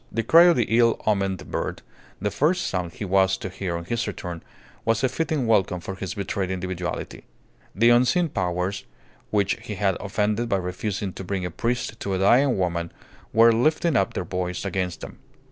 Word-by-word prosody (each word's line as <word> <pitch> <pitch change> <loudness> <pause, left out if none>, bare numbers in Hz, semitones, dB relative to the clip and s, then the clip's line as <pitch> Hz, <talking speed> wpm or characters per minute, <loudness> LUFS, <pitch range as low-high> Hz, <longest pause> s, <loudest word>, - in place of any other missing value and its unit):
The 115 - -1
cry 165 +7 +7
of 175 -1 +6
the 120 - +2
ill 115 -1 +4
omened 100 -3 -1
bird, - - -3 0.4
the 105 +2 -1
first 175 +5 +1
sound 90 -2 -3
he 105 - -5
was 95 0 +3
to 95 - -6
hear 90 -2 -3
on 85 - -7
his 115 +4 -2
return, 90 -4 -6 0.4
was 115 +2 +1
a 130 - +3
fitting 155 -2 -1
welcome 95 -5 +2
for 95 - -6
his 95 -1 -5
betrayed 100 -1 -2
individuality. 90 -1 -4 0.5
The 115 +4 +5
unseen 130 +8 +3
powers 90 -1 -2 0.4
which 100 -2 +1
he 105 - -6
had 95 -2 +1
offended 105 +3 -1
by 100 - +2
refusing 95 +1 -3
to - - -7
bring 95 0 -3
a 90 - -4
priest 120 +3 -2
to 100 -1 -2
a - - 0
dying 120 +7 +4
woman 85 -2 -1 0.4
were 115 +1 +6
lifting 155 +6 +2
up 100 -5 +1
their 90 - -2
voice 90 +1 -3
against 90 -2 -3
him. - - -9
100 Hz, 190 wpm, -24 LUFS, 90-115 Hz, 0.5 s, cry